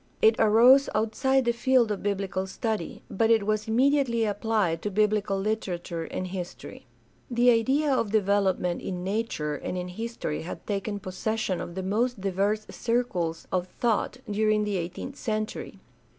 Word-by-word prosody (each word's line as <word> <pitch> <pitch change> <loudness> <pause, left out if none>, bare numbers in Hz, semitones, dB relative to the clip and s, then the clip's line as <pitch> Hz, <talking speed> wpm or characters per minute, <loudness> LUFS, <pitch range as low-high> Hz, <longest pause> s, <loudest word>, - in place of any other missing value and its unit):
It 445 -1 +5
arose 240 +6 +6
outside 260 +5 +1
the 235 - +3
field 240 -1 +3
of 205 - -3
biblical 195 -2 -2
study, 215 -2 -3
but 225 +3 +1
it 225 -3 +4
was 215 +1 0
immediately 245 -1 +2
applied 205 -5 0
to 210 - -2
biblical 210 -1 +1
literature 180 -5 -3
and 185 - -4
history. 180 -1 -7 0.4
The 245 0 +4
idea 270 +6 +2
of 230 -5 +1
development 195 -4 +1
in 180 -2 -4
nature 190 -7 -2
and 150 +5 -4
in 180 0 -4
history 225 -5 -4
had 170 - -7
taken 205 0 -2
possession 200 0 -2
of 170 - -7
the 190 - -3
most 225 +5 0
diverse 200 +3 0
circles 185 -9 -1
of 180 -1 0
thought 235 +4 -1
during 215 0 +2
the 205 -2 -1
eighteenth 180 +11 -5
century. 215 -3 -3
210 Hz, 150 wpm, -27 LUFS, 190-230 Hz, 0.4 s, arose